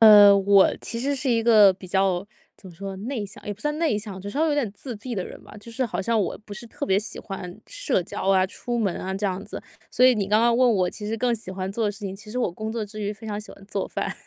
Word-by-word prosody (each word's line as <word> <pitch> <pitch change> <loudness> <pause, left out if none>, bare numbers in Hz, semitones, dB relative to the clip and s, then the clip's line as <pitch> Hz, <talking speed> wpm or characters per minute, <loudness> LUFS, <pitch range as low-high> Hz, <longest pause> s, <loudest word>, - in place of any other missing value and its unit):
呃， 205 -2 +9
我 195 0 +5
其 230 - -5
实 280 +3 0
是 265 -1 -1
一 230 -1 +2
个 215 -4 +7
比 185 - -11
较 190 0 +1 0.3
怎 190 - -13
么 175 - -13
说， 195 +2 -6
内 220 +2 -4
向 195 - -11
也 205 - -3
不 205 - -21
算 295 0 -1
内 315 -11 +1
向， 200 -3 -7
就 200 - -6
稍 290 +8 0
微 325 - +2
有 - - +2
点 275 -8 0
自 240 +2 -7
闭 240 +4 -6
的 190 -4 -2
人 - - -10
吧。 - - -13
就 210 +3 -10
是 255 +1 0
好 205 - -3
像 225 +2 +2
我 185 - -1
不 205 - -10
是 235 - -7
特 - - -5
别 195 0 +3
喜 215 - -6
欢 180 -3 -7
社 - - 0
交 - - -6
啊、 190 -1 +5
出 240 +5 -4
门 200 -6 0
啊， 190 0 -4
这 195 +2 -3
样 190 0 -2
子。 205 - -7 0.3
所 250 - +3
以 255 0 +7
你 200 -3 -1
刚 210 +2 +4
刚 235 0 +4
问 250 0 +5
我 185 -2 +1
其 210 - -7
实 220 +2 -2
更 240 +1 +1
喜 215 -4 -7
欢 185 0 -4
做 225 +1 -1
的 205 - 0
事 200 - -11
情 195 -2 -4
其 210 +1 -11
实 250 - -3
我 245 - +1
工 215 +4 -5
作 225 -2 -2
之 215 +1 -9
余， 205 0 -2
非 220 +2 -11
常 210 -1 -3
喜 215 - -10
欢 195 - -15
做 200 -1 -2
饭。 - - -3
210 Hz, 330 characters per minute, -24 LUFS, 195-235 Hz, 0.3 s, 呃